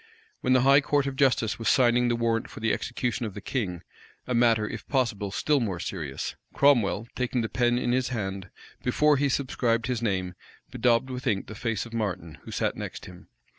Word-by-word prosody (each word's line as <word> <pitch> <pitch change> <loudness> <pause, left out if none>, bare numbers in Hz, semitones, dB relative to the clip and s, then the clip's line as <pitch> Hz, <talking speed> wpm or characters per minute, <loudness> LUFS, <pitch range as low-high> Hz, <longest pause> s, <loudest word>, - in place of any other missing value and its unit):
When 130 - +2
the 130 - +5
high 140 +2 +6
court 145 -1 +1
of 140 -1 -3
justice 130 -5 +2
was 115 - +1
signing 125 -2 +4
the 120 - +1
warrant 115 -1 0
for - - -10
the 115 0 +1
execution 120 0 -2
of 100 - -9
the - - -5
king, 100 -6 -3 0.4
a 125 - -2
matter, 115 -3 +3
if - - -7
possible, 115 -7 0
still 145 +9 +1
more 100 -8 -2
serious, 80 -8 -4 0.2
Cromwell, 115 -7 +3
taking 125 -1 -1
the 110 - -2
pen 120 +2 +2
in 120 - 0
his 130 0 +1
hand, 95 -5 -4 0.3
before 150 +4 +3
he 140 +1 +1
subscribed 120 -4 0
his 125 -3 -2
name, 95 -5 -1 0.4
bedaubed 125 +2 +2
with 125 +1 -5
ink 100 -4 +1
the - - -9
face 115 -1 -2
of 115 - -12
Martin, 95 -8 -3
who - - -12
sat - - -1
next - - -7
him. 90 -1 -13
115 Hz, 205 wpm, -27 LUFS, 105-130 Hz, 0.4 s, high